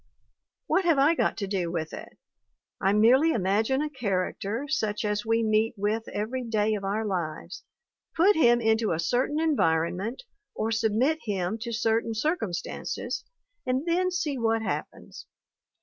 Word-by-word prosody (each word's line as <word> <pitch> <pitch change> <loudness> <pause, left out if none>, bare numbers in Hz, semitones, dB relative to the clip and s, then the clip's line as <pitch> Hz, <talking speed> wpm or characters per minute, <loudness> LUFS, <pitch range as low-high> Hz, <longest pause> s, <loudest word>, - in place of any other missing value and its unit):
What 380 - +2
have 330 -4 +4
I 280 +4 +5
got - - 0
to 200 - -3
do 190 -3 -1
with 160 -2 -3
it? - - -9 0.6
I 195 - +3
merely 255 +10 +5
imagine 220 +7 +1
a 305 - -2
character 210 0 -2
such 215 -6 -1
as 210 +1 -1
we 225 0 +2
meet 220 +1 +1
with 215 +3 -1
every 240 +5 -3
day 220 -2 0
of 205 -2 -3
our 205 +3 -1
lives, 175 -3 -4 0.5
put 385 +5 +5
him 240 -6 +5
into 220 -3 +2
a 160 - -2
certain 250 - 0
environment, 200 - 0 0.3
or 220 +1 -1
submit 225 +7 +1
him 200 0 -2
to 235 +1 -5
certain 225 0 0
circumstances, 220 - -3 0.4
and 255 +3 -1
then 360 +2 +1
see 330 -7 -2
what 225 -1 +1
happens. - - -6
225 Hz, 150 wpm, -27 LUFS, 205-265 Hz, 0.6 s, I